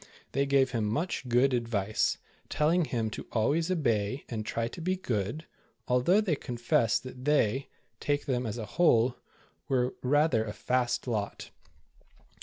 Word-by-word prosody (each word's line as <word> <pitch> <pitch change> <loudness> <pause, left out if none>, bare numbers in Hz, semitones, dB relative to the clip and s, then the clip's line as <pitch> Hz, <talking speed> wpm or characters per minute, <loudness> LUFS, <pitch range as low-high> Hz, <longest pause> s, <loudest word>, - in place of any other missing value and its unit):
They 140 +1 +1
gave 135 -1 +3
him 115 -4 0
much 130 - -2
good 125 +3 +3
advice, 110 -4 0 0.3
telling 165 +3 +2
him 115 -5 -2
to - - -7
always 145 +10 +1
obey 125 - 0
and 110 -3 -3
try 115 +2 -2
to 140 - -8
be 185 +3 0
good, 125 - -3 0.4
although 125 +11 +4
they 195 -8 +1
confessed 120 -4 0
that 130 0 -9
they, 135 -2 +2 0.3
take 145 0 -1
them 125 -3 -1
as 110 - -4
a 110 - -4
whole, 125 -4 +3 0.5
were 125 -1 +1
rather 145 -3 +3
a 105 -2 -5
*'fast" 125 0 0
lot. 110 -5 -3
125 Hz, 150 wpm, -29 LUFS, 115-145 Hz, 0.5 s, although